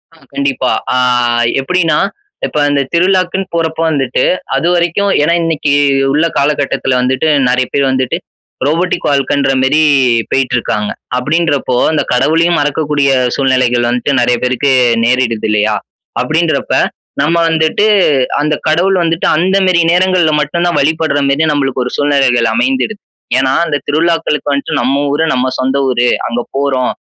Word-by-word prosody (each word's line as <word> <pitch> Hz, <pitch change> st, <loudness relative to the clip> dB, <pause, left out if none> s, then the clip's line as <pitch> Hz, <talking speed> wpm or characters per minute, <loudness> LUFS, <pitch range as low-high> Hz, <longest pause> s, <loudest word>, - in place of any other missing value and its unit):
ஆ, -, -, -21 dB, 0.2 s
கண்டிப்பா. 135 Hz, -2 st, -1 dB, 0.2 s
ஆ, -, -, +1 dB, 0.6 s
எப்படின்னா, 165 Hz, 0 st, 0 dB, 0.5 s
இப்ப -, -, -5 dB
இந்த 140 Hz, -1 st, +1 dB
திருவிழாக்குன்னு 185 Hz, +1 st, 0 dB
போறப்ப 160 Hz, -1 st, -2 dB
வந்துட்டு 135 Hz, -4 st, -1 dB, 0.3 s
அதுவரைக்கும் 175 Hz, +3 st, 0 dB
ஏன்னா 170 Hz, +3 st, +2 dB
இன்னைக்கி 155 Hz, -3 st, -1 dB, 0.4 s
உள்ள 155 Hz, +3 st, +2 dB
காலகட்டத்துல 140 Hz, -2 st, 0 dB
வந்துட்டு, 130 Hz, +4 st, 0 dB, 0.2 s
நெறைய 125 Hz, 0 st, +1 dB
பேரு 140 Hz, -1 st, +1 dB
வந்துட்டு, 130 Hz, -1 st, -1 dB, 0.5 s
ரோபோடிக் 170 Hz, +5 st, -1 dB
வாழ்க்கன்ற 140 Hz, 0 st, +1 dB
மாரி 150 Hz, +4 st, +2 dB, 0.5 s
பேயிட்ருக்காங்க. 120 Hz, -5 st, -1 dB, 0.3 s
அப்படின்றப்போ, 145 Hz, -1 st, 0 dB, 0.2 s
அந்த 155 Hz, -, 0 dB
கடவுளையும் 165 Hz, +6 st, +2 dB
மறக்கக்கூடிய, 145 Hz, -1 st, 0 dB, 0.3 s
சூழ்நிலைகள் 130 Hz, -3 st, +1 dB
வந்துட்டு 125 Hz, +3 st, -1 dB
நெறைய 120 Hz, 0 st, +2 dB
பேருக்கு 130 Hz, +2 st, 0 dB, 0.3 s
நேரிடுதில்லையா? 110 Hz, -4 st, 0 dB, 0.5 s
அப்படின்றப்ப, -, -, -1 dB, 0.5 s
நம்ம 165 Hz, +3 st, +1 dB
வந்துட்டு 160 Hz, +6 st, +1 dB, 0.6 s
அந்த 150 Hz, +1 st, 0 dB
கடவுள் 185 Hz, +5 st, +2 dB
வந்துட்டு, 165 Hz, 0 st, -1 dB
அந்த 185 Hz, +4 st, +1 dB
மாரி 170 Hz, -2 st, +3 dB
நேரங்கள்ல 180 Hz, -3 st, +2 dB
மட்டும் 170 Hz, +4 st, -1 dB
தான் 175 Hz, -, 0 dB
வழிபடுற 155 Hz, 0 st, 0 dB
மாரி 155 Hz, +3 st, +1 dB
நம்மளுக்கு 135 Hz, -3 st, -1 dB
ஒரு 125 Hz, -, -5 dB
சூழ்நிலைகள் 135 Hz, -5 st, +2 dB
அமைந்திடுது. 250 Hz, -4 st, -1 dB, 0.4 s
ஏன்னா, 130 Hz, 0 st, +1 dB
அந்த 145 Hz, -, -1 dB
திருவிழாக்களுக்கு 160 Hz, -1 st, 0 dB
வந்துட்டு, 140 Hz, -3 st, -2 dB
நம்ம 140 Hz, +3 st, 0 dB
ஊரு, 160 Hz, +2 st, 0 dB
நம்ம 130 Hz, +1 st, 0 dB
சொந்த 130 Hz, +1 st, 0 dB
ஊரு, 120 Hz, 0 st, +1 dB, 0.2 s
அங்க 120 Hz, +1 st, -2 dB, 0.2 s
போறோம். 135 Hz, -2 st, 0 dB
145 Hz, 130 wpm, -13 LUFS, 130-165 Hz, 0.6 s, மாரி